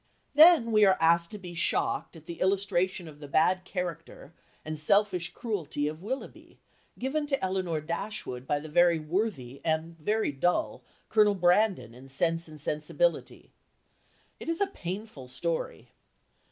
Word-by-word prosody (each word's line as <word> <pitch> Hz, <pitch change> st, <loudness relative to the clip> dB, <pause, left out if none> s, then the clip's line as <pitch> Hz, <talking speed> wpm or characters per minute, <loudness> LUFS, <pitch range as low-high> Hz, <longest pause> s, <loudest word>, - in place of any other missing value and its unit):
Then 305 Hz, -6 st, +7 dB
we 215 Hz, -1 st, +5 dB
are 190 Hz, -2 st, +5 dB
asked 170 Hz, +1 st, +3 dB
to 210 Hz, -, -7 dB
be 180 Hz, -3 st, -9 dB
shocked 170 Hz, +1 st, -1 dB
at 160 Hz, -1 st, -13 dB
the 170 Hz, 0 st, -8 dB
illustration 185 Hz, -2 st, 0 dB
of 150 Hz, -2 st, -12 dB
the 145 Hz, -, -9 dB
bad 180 Hz, +6 st, +2 dB
character 170 Hz, -5 st, -6 dB, 0.3 s
and 155 Hz, -1 st, -4 dB
selfish 180 Hz, +1 st, +2 dB
cruelty 175 Hz, -, -3 dB
of 155 Hz, +2 st, -5 dB
Willoughby 255 Hz, +8 st, -7 dB, 0.4 s
given 295 Hz, +3 st, -2 dB
to 275 Hz, -2 st, 0 dB
Elinor 185 Hz, -4 st, -1 dB
Dashwood 160 Hz, -6 st, -5 dB
by 145 Hz, -, +1 dB
the 150 Hz, +2 st, -7 dB
very 170 Hz, +2 st, +4 dB
worthy 155 Hz, -, -3 dB
and 160 Hz, +1 st, -1 dB
very 215 Hz, +3 st, 0 dB
dull 160 Hz, +6 st, 0 dB, 0.3 s
Colonel 210 Hz, -2 st, +4 dB
Brandon 180 Hz, -, +2 dB
in 130 Hz, +3 st, -14 dB
Sense 165 Hz, +5 st, 0 dB
and 155 Hz, -1 st, -12 dB
Sensibility. 155 Hz, -, -1 dB, 0.9 s
It -, -, -6 dB
is 330 Hz, -, -1 dB
a 400 Hz, -, +3 dB
painful 190 Hz, -, -7 dB
story. 165 Hz, +6 st, -3 dB
175 Hz, 150 wpm, -28 LUFS, 155-210 Hz, 0.9 s, Then